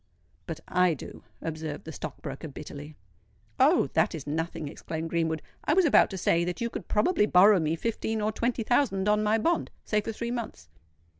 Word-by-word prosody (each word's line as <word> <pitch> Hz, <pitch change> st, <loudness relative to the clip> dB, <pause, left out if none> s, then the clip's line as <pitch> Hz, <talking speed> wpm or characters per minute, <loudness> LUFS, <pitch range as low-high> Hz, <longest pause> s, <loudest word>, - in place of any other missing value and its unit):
"But 165 Hz, 0 st, -5 dB
I 180 Hz, -2 st, +3 dB
do," -, -, -10 dB, 0.2 s
observed 155 Hz, -2 st, -5 dB
the 160 Hz, -, -6 dB
stock -, -, -7 dB
broker 140 Hz, +2 st, -6 dB
bitterly. 145 Hz, +1 st, -9 dB, 0.6 s
"Oh! -, -, +5 dB
that -, -, +2 dB
is 150 Hz, -, -7 dB
nothing," 160 Hz, +1 st, -3 dB
exclaimed 160 Hz, +2 st, -5 dB
Greenwood. 160 Hz, -2 st, 0 dB, 0.2 s
"I 300 Hz, -, +2 dB
was 380 Hz, -1 st, +5 dB
about 300 Hz, -, +5 dB
to 195 Hz, -, -5 dB
say 170 Hz, -1 st, +2 dB
that 175 Hz, 0 st, -3 dB
you 235 Hz, 0 st, -2 dB
could -, -, -6 dB
probably 210 Hz, -, +2 dB
borrow 195 Hz, +2 st, +6 dB
me 160 Hz, 0 st, 0 dB
fifteen 220 Hz, +3 st, -2 dB
or 215 Hz, +1 st, 0 dB
twenty 230 Hz, +1 st, -1 dB
thousand 215 Hz, -5 st, +1 dB
on 210 Hz, 0 st, +3 dB
my 215 Hz, +1 st, +2 dB
bond—say 225 Hz, -6 st, -1 dB
for 225 Hz, -, -4 dB
three 235 Hz, +2 st, -4 dB
months." 230 Hz, -, -5 dB
180 Hz, 190 wpm, -28 LUFS, 160-220 Hz, 0.6 s, borrow